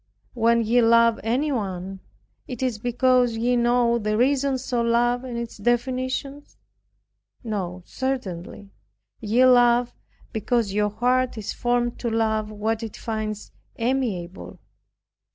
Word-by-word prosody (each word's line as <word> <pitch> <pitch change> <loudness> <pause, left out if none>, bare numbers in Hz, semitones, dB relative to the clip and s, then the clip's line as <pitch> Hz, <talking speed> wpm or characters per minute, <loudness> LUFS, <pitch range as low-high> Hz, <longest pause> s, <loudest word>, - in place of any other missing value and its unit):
When 235 -1 +2
ye 235 +3 +3
love 230 0 +4
anyone, 210 -7 -2 0.5
is 250 -2 -2
it - - -21
because 245 -1 +2
ye 245 +2 +1
know 240 0 +2
the 215 -1 -1
reasons 265 0 0
of 235 -1 +1
love 240 +1 +2
and 245 -2 -5
its 235 -1 -6
definitions? 255 +5 -2 0.9
No, 185 -5 -4
certainly. 205 -7 -5 0.5
Ye 230 +4 +3
love 245 -1 +4 0.4
because 220 -2 0
your 210 0 +1
heart 250 +3 0
is 215 - -4
formed 240 0 -1
to 235 - -2
love 220 -1 0
what 215 +1 -2
it 225 -2 -7
finds 215 -2 -4 0.2
amiable. 230 -8 -3
235 Hz, 120 wpm, -24 LUFS, 215-250 Hz, 0.9 s, love